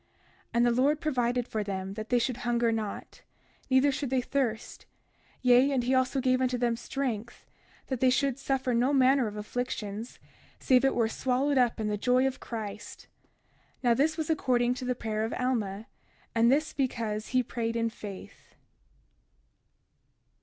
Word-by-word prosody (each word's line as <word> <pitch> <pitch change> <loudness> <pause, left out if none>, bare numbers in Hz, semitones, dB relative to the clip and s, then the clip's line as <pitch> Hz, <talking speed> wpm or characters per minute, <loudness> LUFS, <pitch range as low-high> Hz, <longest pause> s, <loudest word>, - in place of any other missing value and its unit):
31:38 - - -40 0.5
And 235 +1 +4
the 240 - +4
Lord 290 +3 +3
provided 245 -5 0
for 215 -1 -2
them 195 -1 -4
that 215 +1 -7
they 245 - +3
should 245 0 0
hunger 240 -2 +1
not, 220 -2 -5 0.5
neither 260 +2 +4
should 275 -1 -3
they 260 0 +1
thirst; 245 -3 -3 0.6
yea, 250 +2 +5
and 260 -3 +1
he 250 +2 +1
also 260 +1 +2
gave 255 0 +2
them 245 -2 +1
strength, 235 -2 -4 0.4
that 260 -3 -3
they 260 - +4
should 270 0 +1
suffer 270 -2 -1
no 245 +4 +2
manner 265 -2 +4
of 210 - -6
afflictions, 215 0 -4 0.4
save 255 0 +3
it 270 - +2
were 230 -2 +2
swallowed 260 +4 0
up 245 -3 +2
in 215 - -1
the 210 0 -1
joy 250 +3 +3
of 265 -1 -2
Christ. 215 -3 -7 0.7
Now 240 -1 +4
this 310 +6 +1
was 315 0 -1
according 245 -5 +2
to 255 0 -6
the 250 0 0
prayer 220 -2 -2
of 225 - -2
Alma; 220 -5 -2 0.5
and 230 +1 +4
this 305 +3 +1
because 225 -5 -2
he 255 0 +1
prayed 230 -1 -3
in 230 -1 0
faith. 205 -4 -11
245 Hz, 165 wpm, -29 LUFS, 225-260 Hz, 0.7 s, yea